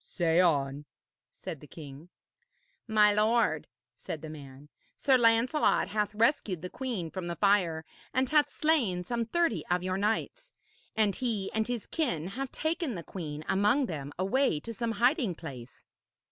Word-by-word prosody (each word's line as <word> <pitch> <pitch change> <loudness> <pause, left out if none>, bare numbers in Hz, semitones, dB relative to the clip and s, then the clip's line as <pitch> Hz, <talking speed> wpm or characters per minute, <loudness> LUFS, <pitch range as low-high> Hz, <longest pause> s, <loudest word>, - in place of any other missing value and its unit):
'Say 170 -2 +1
on,' 145 -5 +2 0.5
said 155 - -7
the 150 - -13
king. 145 +2 -11 0.8
'My 210 -2 +5
lord,' 220 +3 +2 0.3
said 155 -1 -7
the 155 - -6
man, 140 -2 -11 0.3
'Sir 270 -2 +4
Lancelot 235 +4 +3
hath 210 0 -1
rescued 215 - +1
the 180 - -5
queen 225 -12 -4
from 185 -2 -5
the 170 - -3
fire 180 -6 +2 0.3
and 260 0 +1
hath 295 -1 +4
slain 245 - +1
some 235 +3 -2
thirty 280 - +1
of 180 0 0
your 185 0 -1
knights, 225 - -2 0.4
and 215 -3 +2
he 225 -7 -1
and 220 0 0
his 245 -3 -3
kin 215 - -1
have 265 +5 -5
taken 315 - -2
the 170 - -6
queen 155 -5 -6
among 210 +8 +3
them 145 - -5
away 195 - +1
to 230 - -6
some 230 0 -2
hiding 240 - +2
place.' 130 -7 -10
205 Hz, 160 wpm, -30 LUFS, 165-245 Hz, 0.8 s, My